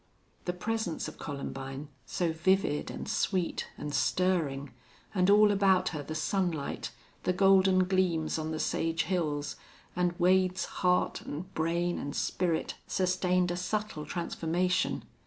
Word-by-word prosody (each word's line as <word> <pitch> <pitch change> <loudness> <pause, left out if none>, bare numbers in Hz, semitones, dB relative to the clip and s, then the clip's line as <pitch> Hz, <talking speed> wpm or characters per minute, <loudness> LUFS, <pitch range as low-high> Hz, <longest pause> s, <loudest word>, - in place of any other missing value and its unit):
The 180 - -1
presence 205 -1 -2
of - - -9
Columbine, 135 -1 -5 0.2
so 170 -3 0
vivid 170 -2 +1
and - - -6
sweet 190 -5 0
and 150 -1 -5
stirring, 150 -9 +1 0.4
and 185 -2 +3
all 210 +1 +7
about 195 -2 +3
her 155 -4 -4
the 155 +2 -6
sunlight, 165 -3 -1 0.3
the 180 - +1
golden 190 0 +5
gleams 180 -4 +1
on 155 0 -3
the 160 0 -3
sage 165 +1 0
hills, 150 -6 -1 0.4
and 180 -1 0
Wade's 185 +1 +3 0.2
heart 180 -1 +2
and 185 +6 -7
brain 170 +2 0
and 145 - -5
spirit 170 -3 0
sustained 180 -1 +1
a - - -1
subtle 180 -4 -3
transformation. 175 +1 0
180 Hz, 135 wpm, -30 LUFS, 160-185 Hz, 0.4 s, all